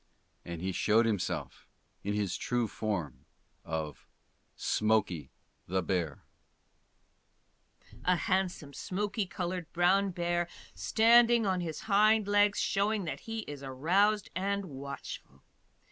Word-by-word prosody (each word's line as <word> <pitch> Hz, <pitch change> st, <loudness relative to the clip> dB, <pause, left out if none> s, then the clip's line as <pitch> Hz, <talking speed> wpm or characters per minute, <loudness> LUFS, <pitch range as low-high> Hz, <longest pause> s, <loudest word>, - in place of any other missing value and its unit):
And 85 Hz, 0 st, -6 dB
he 95 Hz, -, 0 dB
showed 110 Hz, +5 st, +3 dB
himself 105 Hz, -5 st, -2 dB, 0.4 s
in 105 Hz, +1 st, -1 dB
his 100 Hz, -3 st, -1 dB
true 120 Hz, -2 st, 0 dB
form 100 Hz, -9 st, -4 dB, 0.4 s
of 80 Hz, -2 st, -5 dB, 0.5 s
SMOKEY 105 Hz, -, +1 dB, 0.4 s
THE 95 Hz, +1 st, 0 dB
BEAR 85 Hz, -6 st, -2 dB, 1.8 s
A 180 Hz, -, +4 dB
handsome 175 Hz, -3 st, -1 dB
smokey 200 Hz, -, -2 dB
colored 180 Hz, -2 st, -4 dB
brown 190 Hz, +3 st, +3 dB
bear 175 Hz, -1 st, -1 dB, 0.3 s
standing 235 Hz, 0 st, +5 dB
on 185 Hz, -2 st, +1 dB
his 160 Hz, -3 st, -4 dB
hind 215 Hz, 0 st, +4 dB
legs, 205 Hz, 0 st, +4 dB
showing 205 Hz, 0 st, +1 dB
that 160 Hz, -, -4 dB
he 225 Hz, 0 st, -5 dB
is 145 Hz, -7 st, -8 dB
aroused 180 Hz, +11 st, +1 dB
and 200 Hz, +1 st, -1 dB
watchful. 140 Hz, -, -8 dB
175 Hz, 115 wpm, -31 LUFS, -, 1.8 s, standing